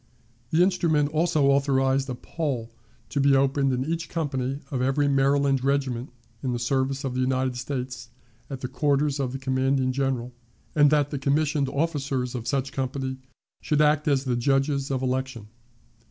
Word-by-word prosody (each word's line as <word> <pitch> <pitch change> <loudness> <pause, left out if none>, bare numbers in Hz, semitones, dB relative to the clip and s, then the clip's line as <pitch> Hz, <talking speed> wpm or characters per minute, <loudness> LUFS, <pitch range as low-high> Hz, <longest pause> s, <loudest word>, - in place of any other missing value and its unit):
The 165 +5 +4
instrument 165 -6 +2
also 155 -1 +2
authorized 135 -1 +2
a 125 - -3
poll 125 -6 -4 0.4
to 145 - -2
be 140 0 +4
opened 135 0 +2
in 130 +1 -1
each 165 +2 -3
company 140 -4 -2
of 130 -3 -1
every 135 +3 +2
Maryland 140 -1 +2
regiment 135 -3 0 0.3
in 130 -2 -1
the - - -1
service 135 +3 -1
of 135 -2 -2
the 130 - -2
United 130 0 0
States 125 -2 -5 0.4
at 135 -2 -6
the 130 - -2
quarters 140 +1 +1
of 130 -3 -1
the 135 - -4
commanding 130 0 +1
officer, 130 -2 -1 0.4
and 145 -1 +5
that 145 -1 +2
the 145 - -3
commissioned 145 0 +1
officers 140 -4 -1
of 120 -2 -5
such 135 0 -1
company 130 0 -3 0.4
should 150 - 0
act 150 0 +3
as 140 -2 +2
the 125 -2 0
judges 135 +2 +1
of 130 -1 -1
election. 130 -4 -3
135 Hz, 170 wpm, -25 LUFS, 130-145 Hz, 0.4 s, and